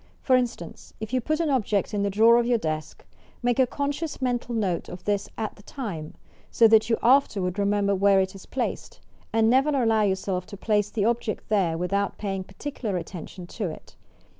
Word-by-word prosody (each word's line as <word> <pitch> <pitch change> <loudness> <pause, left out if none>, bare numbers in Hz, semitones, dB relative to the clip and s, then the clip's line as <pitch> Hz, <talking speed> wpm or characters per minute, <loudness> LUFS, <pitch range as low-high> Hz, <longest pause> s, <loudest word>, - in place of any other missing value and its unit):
For 260 - +4
instance, 240 -10 -3
if 220 +2 -6
you 255 - +2
put 310 +5 -1
an 325 -3 +1
object 215 -6 0
in 205 - 0
the 200 - +1
drawer 225 +4 +5
of 240 - 0
your 245 -1 +3
desk, 155 -6 -4 0.4
make 245 +1 +1
a 260 - +5
conscious 285 +4 -3
mental 245 -2 -1
note 195 -6 -1
of 180 0 -9
this 205 -1 -1
at 220 -1 -3
the 205 - -17
lime, 170 - -5 0.3
so 230 - +5
that 220 0 +5
you 225 - +3
afterward 210 -8 +3
remember 200 0 +2
where 195 0 +4
it 190 0 0
is 195 - -12
placed, 270 - -4 0.3
and 225 0 +3
never 265 +5 +4
allow 230 -6 +2
yourself 190 -2 -1
to 200 - -9
place 210 0 +1
the 210 -2 -1
object 230 -1 -1
there 185 -6 +1
without 200 +3 -1
paying 195 -2 -3
particular 210 0 -5
attention 175 +1 -8
to 190 +1 -4
it. 155 - -11
210 Hz, 195 wpm, -25 LUFS, 195-240 Hz, 0.4 s, drawer